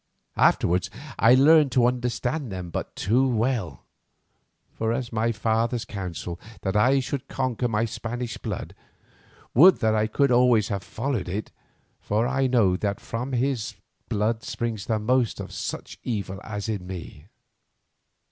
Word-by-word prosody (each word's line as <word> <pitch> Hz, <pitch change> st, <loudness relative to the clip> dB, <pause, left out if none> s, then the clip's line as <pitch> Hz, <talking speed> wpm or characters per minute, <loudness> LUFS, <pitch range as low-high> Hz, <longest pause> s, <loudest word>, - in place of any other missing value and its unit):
Afterwards 90 Hz, +2 st, +3 dB, 0.3 s
I 115 Hz, +3 st, +7 dB
learned 145 Hz, +1 st, +6 dB
to 125 Hz, -2 st, +4 dB
understand 125 Hz, +2 st, -1 dB
them 90 Hz, -2 st, -6 dB
but -, -, -5 dB
too 125 Hz, +7 st, +2 dB
well. 115 Hz, -, -1 dB, 1.0 s
As 115 Hz, +2 st, -1 dB
for 115 Hz, -, -9 dB
my 115 Hz, +2 st, +2 dB
father's 115 Hz, +2 st, 0 dB
counsel, 90 Hz, -4 st, -5 dB, 0.2 s
that 95 Hz, 0 st, -2 dB
I 130 Hz, +6 st, +4 dB
should 135 Hz, +1 st, -4 dB
conquer 130 Hz, -2 st, -1 dB
my 115 Hz, 0 st, +1 dB
Spanish 120 Hz, +1 st, -5 dB
blood, -, -, -5 dB, 0.8 s
would 180 Hz, +9 st, +8 dB
that 110 Hz, -1 st, +3 dB
I 110 Hz, 0 st, +2 dB
could 140 Hz, +4 st, +2 dB
always 120 Hz, -3 st, +4 dB
have 100 Hz, -3 st, -2 dB
followed 110 Hz, +2 st, -3 dB
it, 100 Hz, +4 st, -4 dB, 0.5 s
for 110 Hz, +3 st, 0 dB
I 135 Hz, 0 st, +1 dB
know 115 Hz, -8 st, +3 dB
that 100 Hz, 0 st, -2 dB
from 120 Hz, +3 st, -4 dB
this 130 Hz, -2 st, -1 dB, 0.3 s
blood 110 Hz, +2 st, 0 dB
springs 115 Hz, -4 st, -4 dB
the 110 Hz, -, +1 dB
most 120 Hz, +2 st, +1 dB
of -, -, -6 dB
such -, -, -6 dB
evil 100 Hz, -5 st, -3 dB
as 105 Hz, -1 st, -5 dB
is 110 Hz, -2 st, -1 dB
in 90 Hz, -, -11 dB
me. 85 Hz, -3 st, -8 dB
115 Hz, 150 wpm, -25 LUFS, 105-125 Hz, 1.0 s, would